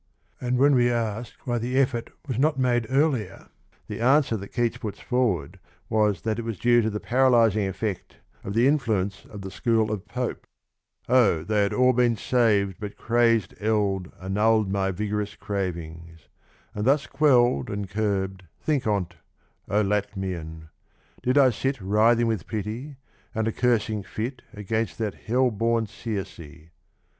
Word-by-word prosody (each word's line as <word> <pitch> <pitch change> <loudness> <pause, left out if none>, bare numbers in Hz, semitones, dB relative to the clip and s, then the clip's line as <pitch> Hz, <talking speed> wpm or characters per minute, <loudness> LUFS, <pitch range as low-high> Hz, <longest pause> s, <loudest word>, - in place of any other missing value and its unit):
And 125 0 0
w^hen 140 +3 +5
we 120 -2 +4
ask 115 -1 -2
why 120 -2 0
the 125 +3 -2
effort 125 -3 +1 0.2
was 130 -3 -2
not 150 0 +2
made 120 -3 +1
earlier, 130 - 0 0.4
the - - -6
answer 130 0 +3
that 100 -2 -6
Keats 120 +1 -1
puts 105 -2 -6
forward 110 - -1 0.3
is 105 -5 +2
that 110 0 -2
it - - -1
was 115 -3 -4
due 120 +2 +4
to 110 - 0
the 105 0 -4
paralysing 115 -5 +3
effect 95 0 -4 0.3
of 100 - -5
the 120 +3 +4
influence 110 -9 0
of 105 - -10
the 95 0 -7
school 110 -1 +1
of 105 -2 -4
Pope: 125 0 -4 0.5
62 125 - -4
O 105 -11 +4
they 105 +2 +1
had 100 +1 +1
all 125 +2 +4
been 120 -1 +3
sav'd 105 -7 +1
but 105 -2 -7
crazed 115 -1 +2
eld 100 -4 0
Annull'd 105 +2 +1
my 95 -1 0
vigorous 105 +2 -3
cravings: 85 -4 -5 0.5
and 105 +1 -3
thus 140 +2 +3
qutU'd 125 - +3
And 100 -1 -3
curb'd, 95 -2 -2
think 145 -7 -1
on't, 90 -5 -1 0.5
O 105 +2 +2
Latmian! 95 -6 -3 0.5
did 125 +3 +1
I 135 -3 +6
sit 135 +3 -2
Writhing 110 +4 +3
with 110 -8 -2
pity, 115 +7 -5 0.4
and 110 0 0
a - - +1
cursing 110 -3 +1
fit 115 +6 -5
Against 110 +2 -3
that 110 -4 -2
hell 125 +2 +1
born 115 +1 +1
Circe. 85 -7 -7
110 Hz, 160 wpm, -25 LUFS, 100-120 Hz, 0.5 s, I